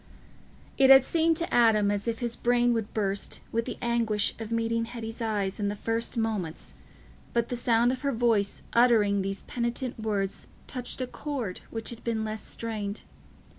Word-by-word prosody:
It 265 -1 +6
had 270 -1 +9
seemed 325 -1 +2
to 335 0 -2
Adam 215 -4 +4
as 205 +2 -2
if 230 0 -2
his 235 -1 -2
brain 240 0 +2
would 225 -2 -2
burst 200 -2 -1
with 230 0 0
the 245 - -5
anguish 230 -3 +1
of 225 0 -6
meeting 230 0 0
Hetty's 230 0 -7
eyes 205 -3 -1
in 205 - 0
the 205 - -2
first 230 +2 -2
moments, 215 -8 -2 0.6
but 235 -1 +1
the 245 - -1
sound 240 0 +3
of 255 - -4
her 280 -1 0
voice 225 -4 +1
uttering 220 -4 +4
these 195 +1 -3
penitent 240 0 -2
words 205 -3 -2 0.2
touched 250 0 -4
a - - 0
chord 250 -8 -4
which 225 0 -5
had 235 - -10
been 225 -2 -1
less 215 0 -4
strained. 215 -3 -4
230 Hz, 175 wpm, -28 LUFS, 210-240 Hz, 0.6 s, had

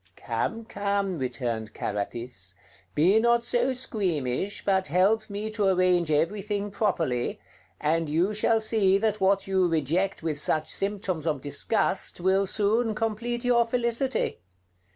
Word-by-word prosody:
"Come, 230 -1 -3
come," 200 -5 -1
returned 120 -4 -3
Carathis, 100 -2 -4 0.4
"be 185 +8 +4
not 235 +1 +3
so 245 +2 +1
squeamish, 195 - -2
but 190 -1 +2
help 200 +8 +2
me 210 +2 -4
to 210 -2 0
arrange 180 -3 +3
everything 200 +6 0
properly, 165 - -1 0.4
and 160 +1 0
you 170 +7 +1
shall 225 +2 +2
see 215 -3 +3
that 215 0 -1
what 195 +1 +3
you 190 -2 +2
reject 165 +4 0
with 155 -3 -2
such 155 +1 0
symptoms 195 -5 -2
of 150 -3 0
disgust 145 - 0
will 190 +2 +2
soon 220 +3 +1
complete 235 +3 -2
your 240 -1 +4
felicity. 235 +2 -1
195 Hz, 130 wpm, -26 LUFS, 160-220 Hz, 0.4 s, be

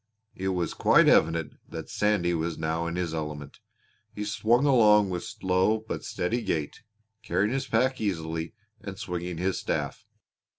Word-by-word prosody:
It 95 - -4
was 90 -4 -1
quite - - +5
evident 80 0 +3
that - - -7
Sandy 105 -5 +1
was 80 0 -2
now 80 +2 -1
in 85 - -3
his 90 -2 -2
element. 75 -2 -5 0.6
He 105 - -4
swung 115 +5 +2
along 105 -7 +5
with 90 -1 -3
slow 95 +4 0
but - - -4
steady 115 +8 -2
gait, 80 -9 -3 0.4
carrying 105 +2 0
his 135 0 -2
pack 130 +3 +1
easily 80 -4 -3 0.2
and 100 -2 -8
swinging 90 -3 -4
his 95 +2 -1
staff. - - -3
90 Hz, 155 wpm, -27 LUFS, 85-105 Hz, 0.6 s, quite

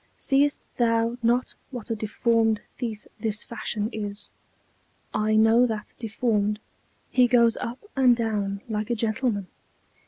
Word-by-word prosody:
"Seest 285 +1 +2
thou 230 0 +2
not 240 +2 +2 0.2
what 245 -3 -6
a - - +1
deformed 225 0 +1
thief 225 -4 -5
this 215 -2 -1
Fashion 215 -2 -2
is?" 205 -1 -4 0.8
"I 215 0 +2
know 225 +3 +5
that 220 -2 -5
Deformed; 210 -2 0 0.5
he 250 -1 +5
goes 235 -2 +4
up 235 +2 -4 0.2
and 255 -3 +5
down 205 -4 -1
like 215 -1 -2
a 240 - +1
gentleman." 220 -2 0
225 Hz, 130 wpm, -26 LUFS, 215-240 Hz, 0.8 s, know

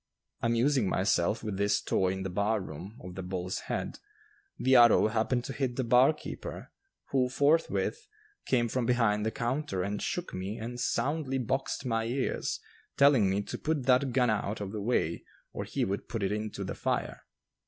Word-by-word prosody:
Amusing 120 -1 +2
myself 95 +2 +1
with 105 -3 -3
this 100 +1 +2
toy 95 -1 +1
in 95 0 -4
the 95 - -3
bar 105 +4 +1
room 95 +5 -8
of 90 0 -8
the 95 - -5
Bull's 90 0 -3
Head, - - -3 0.6
the 130 0 +3
arrow 120 -3 +7
happened 115 +3 0
to 135 - -5
hit 130 -3 -2
the 130 - 0
barkeeper, 125 +6 +1 0.4
who 130 -2 +2
forthwith 160 - +1 0.4
came 120 -2 +2
from 120 0 -1
behind 115 -4 +2
the - - +3
counter 120 -5 -2
and 100 +2 -3
shook 175 0 -3
me 95 +4 -4
and 120 +2 -6
soundly 135 +3 0
boxed 130 +2 -2
my 115 -2 0
ears, 130 +3 -1 0.4
telling 140 -8 +5
me 100 +2 0
to - - -6
put 155 -3 -1
that 130 +1 +3
gun 125 -2 +3
out 105 0 -2
of 100 -2 -4
the 105 -1 -4
way 100 -7 0 0.3
or - - -4
he - - -1
would 100 +1 -4
put 115 -4 -3
it 95 - 0
into 105 0 -3
the - - -4
fire. - - -2
115 Hz, 180 wpm, -30 LUFS, 100-130 Hz, 0.6 s, arrow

